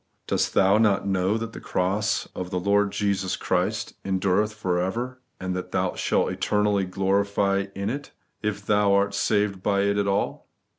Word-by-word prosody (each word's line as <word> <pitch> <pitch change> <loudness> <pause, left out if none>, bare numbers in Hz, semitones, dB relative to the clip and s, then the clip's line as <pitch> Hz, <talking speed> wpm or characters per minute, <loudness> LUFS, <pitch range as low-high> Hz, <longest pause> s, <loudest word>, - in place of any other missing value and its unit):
Dos^ - - +1
thoa 100 +2 +4
not 100 -3 +2
know 95 +2 +1
that 115 0 -5
the - - -8
cra^ 100 +4 0
of 90 -1 -5
the 90 -1 -1
Lord 100 +2 +2
Jesus 100 -2 0
Christ - - -1
endureth 95 +2 +1
for 95 -5 -1
ever, 120 +8 -3 0.2
and 95 0 -3
that 90 - -5
thou - - 0
shalt - - +1
eternally 105 -2 +1
glory 95 +2 +1 0.5
in 100 +2 -2
it, 140 +2 -5 0.3
if 105 -1 -3
thou 105 -1 +3
art 100 0 +2
saved 100 -2 +1
by 100 0 +1
it 100 0 +1
at 100 - 0
all 100 0 -1
100 Hz, 170 wpm, -25 LUFS, 95-105 Hz, 0.5 s, thoa